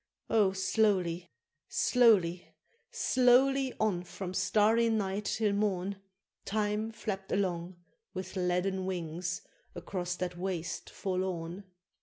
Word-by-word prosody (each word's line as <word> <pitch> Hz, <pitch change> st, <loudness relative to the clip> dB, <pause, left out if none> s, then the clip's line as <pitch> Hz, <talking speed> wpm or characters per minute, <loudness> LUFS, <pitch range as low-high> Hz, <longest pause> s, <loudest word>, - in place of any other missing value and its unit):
Oh! 205 Hz, -4 st, +4 dB
slowly, 190 Hz, -3 st, +1 dB, 0.4 s
slowly, 195 Hz, -8 st, +3 dB, 0.3 s
slowly 260 Hz, +1 st, +3 dB
on, 210 Hz, -5 st, +1 dB
from 180 Hz, +1 st, -6 dB
starry 220 Hz, +4 st, +3 dB
night 205 Hz, -2 st, -1 dB
till 215 Hz, -1 st, +1 dB
morn, 200 Hz, -1 st, 0 dB, 0.5 s
Time 210 Hz, +1 st, -1 dB
flapp'd 195 Hz, -3 st, -5 dB
along, 180 Hz, -2 st, -1 dB, 0.4 s
with 185 Hz, 0 st, -6 dB
leaden 185 Hz, +1 st, 0 dB
wings, 175 Hz, 0 st, -3 dB, 0.3 s
across 175 Hz, 0 st, -3 dB
that 180 Hz, -1 st, -4 dB
waste 180 Hz, -2 st, -3 dB
forlorn! 185 Hz, -1 st, -3 dB
190 Hz, 100 wpm, -31 LUFS, 180-210 Hz, 0.5 s, Oh